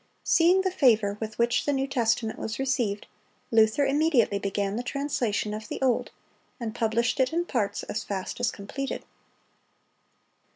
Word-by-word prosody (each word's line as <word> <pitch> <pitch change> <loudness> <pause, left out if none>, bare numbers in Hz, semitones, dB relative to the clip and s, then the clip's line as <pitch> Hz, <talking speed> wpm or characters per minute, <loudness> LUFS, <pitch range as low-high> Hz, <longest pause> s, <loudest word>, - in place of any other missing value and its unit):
Seeing 350 +3 +4
the 380 -1 0
favor 220 - +3
with 220 0 -5
which 235 0 +2
the 290 - +2
New 270 0 0
Testament 230 -4 0
was 220 +1 -4
received, 245 -6 -1 0.5
Luther 225 +5 +4
immediately 275 -8 +2
began 200 0 -2
the 235 - -1
translation 250 -6 -1
of 215 0 -6
the - - -5
Old, 255 -3 +1 0.5
and 225 -3 -4
published 235 +4 0
it 260 -1 +3
in 340 +2 0
parts 205 - -1
as 210 0 -4
fast 195 +2 -4
as 245 -1 +2
completed. 270 +8 -5
235 Hz, 155 wpm, -27 LUFS, 215-270 Hz, 0.5 s, Seeing